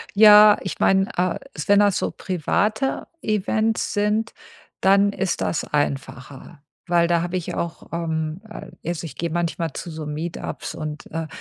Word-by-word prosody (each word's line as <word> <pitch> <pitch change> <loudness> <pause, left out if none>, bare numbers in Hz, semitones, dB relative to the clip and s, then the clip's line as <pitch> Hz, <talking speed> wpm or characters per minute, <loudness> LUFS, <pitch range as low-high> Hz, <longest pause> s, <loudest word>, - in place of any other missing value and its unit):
Ja, 210 0 +9
ich 190 - -5
meine, 195 0 +4
äh, 180 0 0 0.2
s 150 - -6
wenn 205 0 +6
das 205 -2 +3
so - - -1
private 210 - -1 0.2
Events 215 +1 0
sind, 210 +2 0 0.5
dann 200 +1 +4
ist 190 -2 -2
das 160 - -1
einfacher. 140 +1 -4 0.2
Weil 170 -1 +3
da 170 0 +2
habe 175 +2 -2
ich 175 - -4
auch, 170 0 -5
ähm, 160 0 -2
äh - - -9 0.2
also 170 -1 -3
ich 160 - -8
gehe 170 - -2
manchmal 165 -2 -2
zu 175 - -6
so 155 -1 -6
Meet-ups 160 +3 -5
und, 155 -1 -6
äh, 165 -1 -3
175 Hz, 165 wpm, -22 LUFS, 160-205 Hz, 0.5 s, Ja